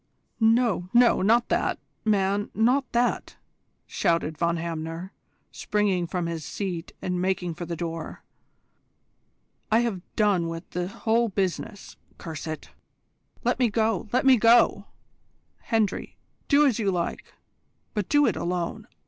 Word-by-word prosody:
"No, 225 -5 +2
no, 240 0 +5
not 230 +5 +3
that, - - +1 0.3
man, 205 -1 +1
not 250 +5 +2
that!" 240 +1 0 0.5
shouted 165 -2 0
Von 170 +1 0
Hamner, 165 +2 -5 0.4
springing 195 -4 0
from 175 0 -2
his 165 -2 -4
seat 180 -2 -4
and 180 -1 -1
making 185 -2 -1
for 170 +1 -7
the 170 - -3
door. 165 -1 -6 1.5
"I 225 +2 +5
have 225 -7 -2
done 200 -6 +2
with 165 +1 -6
the 180 0 -2
whole 230 +4 0
business, 195 +1 -3 0.2
curse 160 -2 -7
it! 155 -1 -6 0.7
Let - - +1
me 245 -2 +3
go, 220 -2 0
let 255 +2 +1
me 265 -2 +7
go! 230 -3 +4 0.7
Hendry, 220 -4 -1 0.3
do 290 +1 +5
as 250 -5 +2
you 205 -3 +1
like, 175 -3 -3 0.6
but 210 -4 -2
do 290 0 +4
it 225 - +1
alone. 180 +5 -3
195 Hz, 135 wpm, -26 LUFS, 170-225 Hz, 1.5 s, me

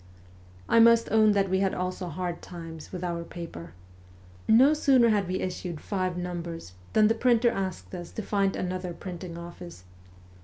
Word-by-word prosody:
I 230 - +4
must 230 0 +5
own 215 -1 +5
that 200 -1 +2
we 190 0 +1
had 195 -1 +1
also 180 0 -3
hard 175 +1 -4
times 165 -3 -9
with 180 -1 -6
our 170 -1 -2
paper. 165 - -9 0.7
No 255 +7 +6
sooner 265 -6 +4
had 205 -4 +1
we 185 +1 -2
issued 180 -3 -4
five 185 -2 -2
numbers 170 - -5 0.2
than 215 -1 +5
the 225 - +3
printer 235 0 +3
asked 185 - -4
us 175 -1 -6
to 220 - -4
find 195 -1 0
another 180 -1 -3
printing 175 -2 -7
office. 170 - -10
185 Hz, 165 wpm, -27 LUFS, 170-210 Hz, 0.7 s, No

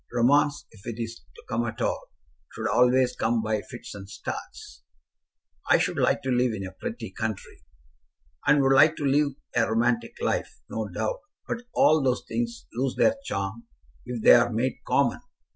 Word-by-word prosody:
Romance, 145 +4 +3
if 100 -3 -16
it 115 -1 -5
is 115 0 -5
to - - -14
come 115 +2 -1
at 110 - -5
all, - - -2 0.5
should - - -2
always 125 0 +3
come 115 0 0
by 110 -1 0
fits - - -10
and 100 -1 -10
starts." 95 -8 -7 0.9
"I - - +7
should - - -1
like - - +2
to 130 - -1
live 125 -1 +2
in 95 -2 -5
a 95 - -7
pretty 95 - -6
country." 110 -5 -5 0.9
"And 145 -2 +5
would 135 0 +4
like 155 +4 +6
to 145 - -3
live 140 +1 +2 0.2
a 115 -2 +2
romantic 115 0 +1
life, - - -2
no 110 -1 -3
doubt; 110 +4 -2 0.3
but 235 +1 -4
all 155 0 +5
those 130 -2 0
things 235 0 -3
lose 130 +2 -1
their 275 - +4
charm 100 - -4 0.4
if 120 -2 -5
they - - +9
are 120 0 +5
made 120 +4 -1
common. 140 - +2
120 Hz, 175 wpm, -26 LUFS, 110-135 Hz, 0.9 s, they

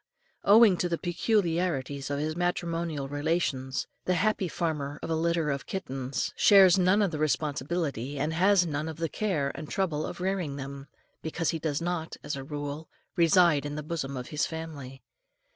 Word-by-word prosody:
Owing 210 -2 +7
to 175 - -1
the 170 - 0
peculiarities 170 - 0
of 140 - -1
his 155 +2 -2
matrimonial 170 -4 -2
relations, 145 -3 -1 0.2
the 180 - +2
happy 200 0 +1
father 150 -4 -2
of - - -3
a - - +2
litter 165 -1 +1
of 140 -1 -4
kittens 135 -7 -3
shares 195 -3 +7
none 185 +3 +4
of 195 - 0
the 155 - -4
responsibility, 145 -1 -1
and 150 +3 -1
has 185 +2 +4
none 155 0 -2
of 160 - -7
the 165 0 -1
care 155 -10 -1
and 155 - -8
trouble 160 -6 -1
of - - -7
rearing 180 -6 -1
them, 140 0 -7 0.3
because 165 +1 -1
he 165 - -3
does 155 -1 -2
not, 170 -2 -3
as 145 - -3
a 135 - -6
rule, 145 +2 -5 0.3
reside 170 -3 +4
in 145 0 -4
the 150 - -4
bosom 145 -4 -4
of 125 - -6
his 150 - 0
family. 150 -5 -7
160 Hz, 175 wpm, -28 LUFS, 140-175 Hz, 0.3 s, Owing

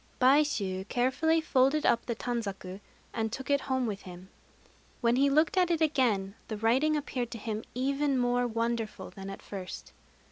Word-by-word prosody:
Baishû 250 -9 +2
carefully 290 +8 +2
folded 280 0 +2
up 235 - +2
the 235 - -1
tanzaku, 200 -6 -4 0.3
and 220 -1 -1
took 265 +4 -4
it 280 -1 +3
home 260 -2 0
with 205 -3 -3
him. 180 +1 -11 0.7
When 235 -1 +2
he 275 +2 +4
looked 310 +6 +3
at 360 -1 +4
it 335 -2 +1
again 240 -11 +1
the 215 - -4
writing 260 +8 +2
appeared 255 -5 -3
to 235 - -6
him 215 0 -4
even 275 +2 +1
more 245 0 +2
wonderful 230 -1 -2
than 195 -1 -8
at 195 - -8
first. 190 -3 -8
245 Hz, 170 wpm, -30 LUFS, 215-280 Hz, 0.7 s, he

